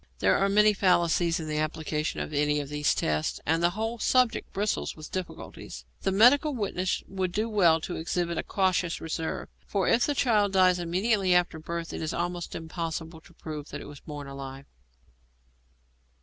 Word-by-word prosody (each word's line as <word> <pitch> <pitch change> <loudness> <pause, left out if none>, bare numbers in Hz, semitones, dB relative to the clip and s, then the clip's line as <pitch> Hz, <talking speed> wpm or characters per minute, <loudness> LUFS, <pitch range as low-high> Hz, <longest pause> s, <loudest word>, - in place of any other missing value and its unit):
There - - +3
are 195 - +2
many 210 +1 +5
fallacies 175 -3 +2
in 160 - -5
the 150 0 -1
application 155 0 -2
of - - -5
any 150 0 +2
of 140 -1 -5
these 150 0 +1
tests, 75 0 -1
and 165 +2 +2
the 175 - +4
whole 225 +2 -2
subject 250 +1 +2
bristles 205 +2 -1
with 155 0 -10
difficulties. 185 - -7 0.2
The 195 - 0
medical 260 +8 +5
witness 190 -4 -1
would 185 -2 -2
do 215 +5 -1
well 180 -7 +4
to 175 - -4
exhibit 170 0 -1
a - - +1
cautious 185 -3 0
reserve, 160 0 -4 0.2
for 195 -3 0
if 235 - +3
the 290 - 0
child 210 -7 +2
dies 185 -1 +4
immediately 185 +2 +1
after 175 -2 +1
birth 170 +1 -5
it - - -4
is 155 - -2
almost 175 0 -3
impossible 160 0 -5
to 155 - -19
prove 150 -2 -7
that - - -6
it - - -9
was 145 -1 -10
born 145 -2 -8
alive. 135 0 -8
175 Hz, 180 wpm, -28 LUFS, 155-195 Hz, 0.2 s, many